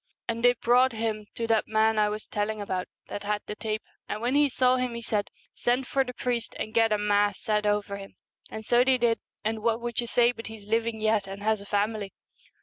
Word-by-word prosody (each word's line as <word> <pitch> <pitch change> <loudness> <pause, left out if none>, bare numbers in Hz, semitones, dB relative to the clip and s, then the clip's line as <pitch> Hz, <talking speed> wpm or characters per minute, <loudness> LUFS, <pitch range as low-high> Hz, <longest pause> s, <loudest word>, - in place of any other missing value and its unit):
And 230 0 -2
they 245 0 +7
brought 245 +1 +3
him 220 -2 -2
to 230 - -2
that 225 -1 +2
man 220 0 +3
I 210 0 +3
was 210 +1 -5
telling 210 +1 -2
about, 185 -3 -3 0.2
that 205 - -5
had 205 0 -2
the - - -5
tape, 215 0 -3 0.3
and 210 - -2
when 240 +3 0
he 290 0 +4
saw 255 0 +3
him 250 -2 -1
he 235 - -5
said, 210 -3 -1
" - - -35
Send 250 +2 0
for 270 +2 +1
the 250 -1 -8
priest, 240 -2 -2
and 215 - -4
get 225 -1 +4
a 210 - +3
Mass 205 -1 +2
said 210 -2 0
over 205 -1 0
him." 195 0 -11 0.3
And 220 0 -7
so 240 +2 +5
they 260 0 +3
did, 235 -2 +2 0.3
and 220 0 -1
what 230 0 +1
would 240 0 -2
you 235 - -5
say 240 0 +4
but 230 -2 -9
he's 220 -2 -10
living 225 +1 0
yet 215 -2 +2
and 195 +1 -7
has 215 -1 +1
a 200 - -11
family 205 0 -1
220 Hz, 240 wpm, -27 LUFS, 210-235 Hz, 0.3 s, they